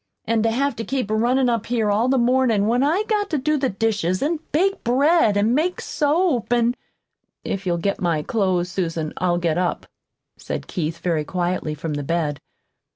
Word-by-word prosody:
"An' 225 Hz, -1 st, +1 dB
to 225 Hz, -, +2 dB
have 270 Hz, +3 st, 0 dB
to 225 Hz, -, -3 dB
keep 255 Hz, -4 st, -2 dB
runnin' 245 Hz, +4 st, +2 dB
up 230 Hz, -2 st, -1 dB
here 225 Hz, -3 st, +1 dB
all 220 Hz, +4 st, +2 dB
the 265 Hz, -, +3 dB
mornin' 240 Hz, -4 st, +2 dB
when 240 Hz, +3 st, +2 dB
I've 340 Hz, +10 st, +1 dB
got 415 Hz, -2 st, 0 dB
to 310 Hz, -, 0 dB
do 305 Hz, +3 st, +1 dB
the 270 Hz, -3 st, 0 dB
dishes, 200 Hz, -3 st, 0 dB
an' 315 Hz, +2 st, 0 dB
bake 385 Hz, +6 st, +1 dB
bread, 265 Hz, -2 st, +3 dB
an' 215 Hz, +4 st, +2 dB
make 335 Hz, +7 st, 0 dB
soap, 300 Hz, -4 st, 0 dB
an' 240 Hz, 0 st, +3 dB, 0.4 s
" -, -, -56 dB
"If 195 Hz, -1 st, -5 dB
you'll 170 Hz, -1 st, +1 dB
get 200 Hz, +4 st, -2 dB
my 165 Hz, -4 st, 0 dB
clothes, 185 Hz, -5 st, 0 dB
Susan, 165 Hz, -4 st, -2 dB
I'll 175 Hz, -1 st, +1 dB
get 175 Hz, -1 st, 0 dB
up," 180 Hz, -1 st, -1 dB, 0.5 s
said -, -, -5 dB
Keith 165 Hz, -2 st, -3 dB
very 165 Hz, -3 st, -1 dB
quietly 175 Hz, -2 st, -2 dB
from 155 Hz, +1 st, -4 dB
the 145 Hz, -, -2 dB
bed. 150 Hz, -2 st, -1 dB
225 Hz, 195 wpm, -22 LUFS, 175-265 Hz, 0.5 s, the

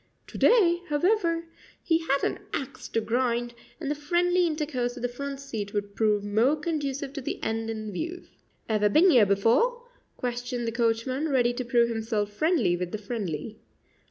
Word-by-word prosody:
To -, -, -9 dB
day, 355 Hz, -7 st, +5 dB
however, 335 Hz, +1 st, +1 dB, 0.4 s
he 325 Hz, -1 st, +2 dB
had 275 Hz, +1 st, +1 dB
an -, -, 0 dB
axe 275 Hz, -1 st, -4 dB
to 225 Hz, -, 0 dB
grind, 240 Hz, +1 st, 0 dB, 0.3 s
and 290 Hz, -3 st, -3 dB
the -, -, +2 dB
friendly 350 Hz, +4 st, +2 dB
intercourse 290 Hz, -6 st, -2 dB
of 245 Hz, -, -8 dB
the -, -, +2 dB
front 275 Hz, +3 st, -6 dB
seat 215 Hz, -7 st, -5 dB
would 205 Hz, 0 st, -3 dB
prove 210 Hz, -2 st, +2 dB
more 220 Hz, +8 st, +2 dB
conducive 290 Hz, -3 st, -3 dB
to 280 Hz, -, -5 dB
the -, -, -4 dB
end 225 Hz, 0 st, -2 dB
in 215 Hz, -1 st, -4 dB
view. 340 Hz, -, -4 dB, 0.4 s
"Ever 210 Hz, -2 st, +2 dB
been 345 Hz, -, +5 dB
ere 235 Hz, -8 st, +6 dB
before?" 245 Hz, -, +2 dB, 0.3 s
questioned 245 Hz, 0 st, -3 dB
the -, -, 0 dB
coachman, 235 Hz, +5 st, 0 dB
ready 245 Hz, -3 st, +2 dB
to 255 Hz, -, -3 dB
prove 235 Hz, -1 st, +3 dB
himself 220 Hz, -2 st, -2 dB
friendly 285 Hz, -, +2 dB
with 175 Hz, 0 st, -4 dB
the -, -, -2 dB
friendly. 210 Hz, -3 st, -5 dB
245 Hz, 175 wpm, -27 LUFS, 225-300 Hz, 0.4 s, ere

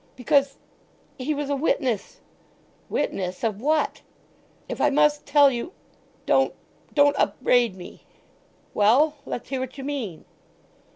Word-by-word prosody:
"Because—he 275 Hz, 0 st, -3 dB
was 285 Hz, 0 st, -3 dB
a -, -, +1 dB
witness!" 265 Hz, -6 st, -1 dB, 0.7 s
"Witness? 180 Hz, -1 st, -3 dB
Of 215 Hz, -2 st, -1 dB
what? 310 Hz, +4 st, 0 dB, 0.7 s
"If -, -, -5 dB
I 295 Hz, -, +4 dB
must 295 Hz, +1 st, +2 dB
tell 285 Hz, -1 st, +6 dB
you——. 250 Hz, +9 st, -5 dB, 0.5 s
Don't, -, -, +2 dB, 0.4 s
don't 285 Hz, -1 st, +5 dB
upbraid 245 Hz, -5 st, +2 dB
me!" 180 Hz, -1 st, -12 dB, 0.7 s
"Well! 275 Hz, +9 st, +3 dB
Let's 245 Hz, -, -5 dB
hear 265 Hz, -1 st, -2 dB
what 260 Hz, +1 st, -6 dB
you 270 Hz, -, -6 dB
mean?" 260 Hz, -, -5 dB
275 Hz, 120 wpm, -24 LUFS, 235-290 Hz, 0.7 s, tell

